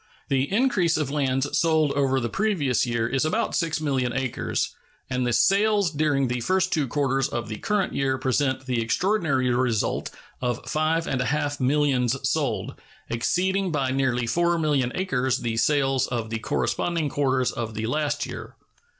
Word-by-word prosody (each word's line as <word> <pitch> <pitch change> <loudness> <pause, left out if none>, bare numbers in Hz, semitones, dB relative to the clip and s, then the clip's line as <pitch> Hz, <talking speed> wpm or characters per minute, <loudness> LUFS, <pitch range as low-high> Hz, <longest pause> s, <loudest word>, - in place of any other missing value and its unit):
The 135 +2 +1
increase 200 -8 +2
of 150 -3 -2
lands 135 -1 0
sold 160 -3 +3
over 135 -2 +1
the 120 - -1
previous 150 - 0
year 115 -1 0
is 135 +3 0
about 210 +9 0
6,000,000 140 -7 -1
acres, 130 -2 -2 0.4
and 125 -1 0
the - - +1
sales 200 - +3
during 145 -3 +1
the 125 0 -2
first 185 +7 +1
two 150 -5 +1
quarters 135 0 0
of 120 -2 -4
the 110 - -4
current 210 - -1
year 135 -1 0
present 130 0 0
the 125 -3 0
extraordinary 140 - +1
result 120 -4 0 0.3
of 120 -1 -2
five 155 +3 0
and 130 - -1
a - - 0
half 145 0 -1
millions 135 -2 +2
sold, - - -1 0.4
exceeding 185 +10 0
by 135 -4 0
nearly 130 -2 0
4,000,000 155 -2 +1
acres 130 -9 0
the 115 -2 -3
sales 135 +1 +2
of 115 -3 -3
the 115 - -2
corresponding 165 +7 -1
quarters 130 -3 +1
of 115 -2 -5
the 110 +1 -2
last 145 +3 -1
year. - - -8
135 Hz, 160 wpm, -25 LUFS, 125-160 Hz, 0.4 s, sold